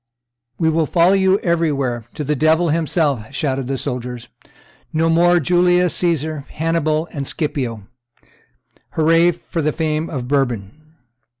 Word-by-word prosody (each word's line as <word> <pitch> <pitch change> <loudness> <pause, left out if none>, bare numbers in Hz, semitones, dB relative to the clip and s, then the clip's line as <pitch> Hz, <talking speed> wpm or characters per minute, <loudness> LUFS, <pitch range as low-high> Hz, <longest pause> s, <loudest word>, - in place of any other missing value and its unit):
"We 160 - +1
will 160 -1 +1
follow 175 +2 +4
you 190 0 +3
everywhere, 140 - 0
to 150 - -4
the 150 +1 0
devil 160 +4 +2
himself!" 150 -7 0
shouted 135 -3 -1
the 135 0 -2
soldiers; 125 -1 -5 0.6
"no 165 +1 +1
more 175 +2 +4
of 170 - 0
Julius 180 +1 +3
Caesar, 155 -4 -1
Hannibal, 160 0 -1
and 140 -4 -5
Scipio! 125 - -3 1.1
Hurrah! 165 +2 +4 0.2
for 165 - -2
the 155 0 +1
fame 155 0 -2
of 130 -5 -4
Bourbon!" 135 +2 -2
155 Hz, 135 wpm, -19 LUFS, 135-165 Hz, 1.1 s, follow